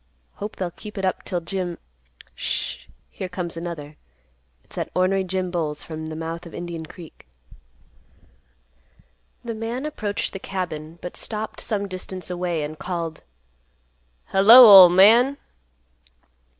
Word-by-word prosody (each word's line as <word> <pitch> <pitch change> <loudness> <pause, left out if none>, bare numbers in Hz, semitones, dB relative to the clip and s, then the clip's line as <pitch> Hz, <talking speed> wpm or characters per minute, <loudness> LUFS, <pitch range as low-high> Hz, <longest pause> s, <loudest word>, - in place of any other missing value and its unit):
Hope 210 +1 -6
they'll 180 -2 -4
keep 210 +4 -11
it 195 - -2
up 185 - -2
'till 175 -1 -3
Jim—Sh—h—h 65 - -6 0.2
Here 185 - -6
comes 180 -2 -4
another. 165 -3 -7 0.7
It's - - -17
that - - -3
ornery 190 +1 +2
Jim 185 -1 -3
Bowles 155 -4 -3
from 160 -1 -7
the 155 - -6
mouth 165 +2 -6
of 165 - -12
Indian 170 -2 -6
Creek." 165 - -14 2.2
The 230 - -3
man 230 +5 -4
approached 210 -9 -3
the 195 - -6
cabin, 165 -5 -5
but 180 - -7
stopped 215 0 -5
some 200 -2 -2
distance 185 -1 -6
away 175 -3 -2
and 150 +1 -7
called, 170 -3 -4 1.1
"Hello, 225 +6 +9
ol' 195 -4 +11
man!" 230 +10 +5
180 Hz, 130 wpm, -23 LUFS, 165-195 Hz, 2.2 s, ol